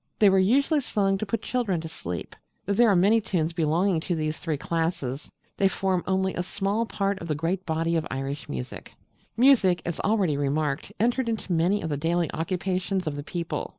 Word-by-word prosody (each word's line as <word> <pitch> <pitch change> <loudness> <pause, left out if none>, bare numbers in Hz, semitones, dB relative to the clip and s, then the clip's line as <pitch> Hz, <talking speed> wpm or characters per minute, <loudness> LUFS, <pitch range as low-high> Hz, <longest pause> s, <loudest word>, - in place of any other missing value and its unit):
They 205 -2 +6
were 190 - +4
usually 280 - +3
sung 195 -5 0
to 215 - -3
put 215 +2 -2
children 225 -9 0
to 160 - -6
sleep. 90 - -6 0.3
Though 200 - 0
there 235 +3 +5
are 200 - +4
many 205 +6 +4
tunes 170 -6 -1
belonging 170 +2 +1
to 175 +2 -2
these 155 -1 -2
three 160 -4 -2
classes, 160 -4 -2 0.3
they 195 - +4
form 190 -1 0
only 190 0 +1
a - - -2
small 200 +5 -1
part 200 -2 -1
of 170 - -7
the 155 - 0
great 175 +5 -2
body 165 +1 0
of 160 -2 0
Irish 135 +2 -4
music. 65 -2 -6 0.4
Music 230 -8 +5
as 170 - -3
already 195 -9 +1
remarked 145 +1 -1
entered 240 +2 +1
into 220 -5 -2
many 175 +5 +2
of 160 - -2
the 145 - -1
daily 165 +2 0
occupations 185 +3 -1
of 155 -2 -2
the 145 - -4
people. 170 +3 -4
180 Hz, 200 wpm, -26 LUFS, 160-200 Hz, 0.4 s, They